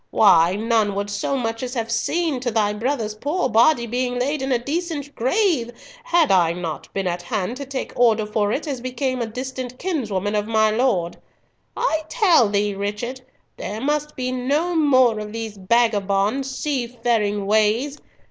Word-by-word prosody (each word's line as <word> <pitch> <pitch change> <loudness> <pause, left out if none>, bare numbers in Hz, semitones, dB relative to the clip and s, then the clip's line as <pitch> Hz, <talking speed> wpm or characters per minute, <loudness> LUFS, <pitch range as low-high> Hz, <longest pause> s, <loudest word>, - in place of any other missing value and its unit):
Why, 180 -4 +5
none 220 -2 +1
would 200 +1 -3
so 205 +7 -1
much 225 -2 -3
as 250 0 -4
have 230 -1 -2
seen 315 +4 0
to 245 -1 -2
thy 215 -2 +1
brother's 225 -1 -2
poor 290 +10 -1
body 235 +3 +4
being 245 +1 -2
laid 280 +4 -1
in 270 0 -2
a 250 - +4
decent 290 +2 -4
grave 285 - +1 0.3
had 345 - +3 0.3
not 165 -3 -5
I - - -36
been 195 -1 -3
at 175 -1 -2
hand 195 +4 -3
to 280 -1 -7
take 270 -1 -5
order 225 -3 +3
for 210 -1 0
it 305 +7 -2
as 270 -4 -3
became 255 0 -2
a 230 - -1
distant 255 +1 -6
kinsman 215 - -2
of 210 0 0
my 220 -1 +3
lord. 215 -7 0 0.6
I 320 -10 +1
tell 360 - +4
thee, 205 0 0
Richard, 210 +6 -4 0.4
there 210 +2 -5
must 295 +3 -1
be 255 0 -2
no 285 +8 0
more 260 -8 +4
of 210 0 -7
these 225 -2 -5
vagabond 210 +3 +1
seafaring 235 -7 -1
ways. 220 +7 +1
235 Hz, 170 wpm, -22 LUFS, 210-270 Hz, 0.6 s, Why